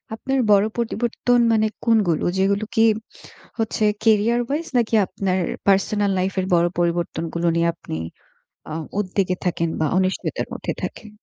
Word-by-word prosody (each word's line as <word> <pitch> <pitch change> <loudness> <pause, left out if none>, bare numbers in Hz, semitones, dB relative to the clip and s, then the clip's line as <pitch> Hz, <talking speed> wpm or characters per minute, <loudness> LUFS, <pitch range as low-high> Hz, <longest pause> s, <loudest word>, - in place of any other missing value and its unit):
আপনার 270 +4 -2
বড় 205 0 +5
পরিবর্তন 240 +1 0
মানে 220 0 +3 0.2
কোনগুলো? 210 -9 +2
যেগুলো 200 +2 +1
কি 225 - +4 0.8
হচ্ছে 220 -1 -1 0.2
career-wise 235 +8 +2
নাকি 230 -1 +1
আপনার 190 -1 -1 0.3
পার্সোনাল 200 +1 +2
লাইফের 185 0 -1
বড় 170 0 +4
পরিবর্তনগুলো 170 -1 -1
নিয়ে 170 0 +2
আপনি 160 - -8 0.7
অ - - -7 0.3
উদ্বেগে 185 -1 0
থাকেন 170 -2 0
বা, 155 - +2
অনিশ্চয়তার 190 0 -1
মধ্যে - - -4
থাকেন? 215 - -6
200 Hz, 130 wpm, -22 LUFS, 175-225 Hz, 0.8 s, বড়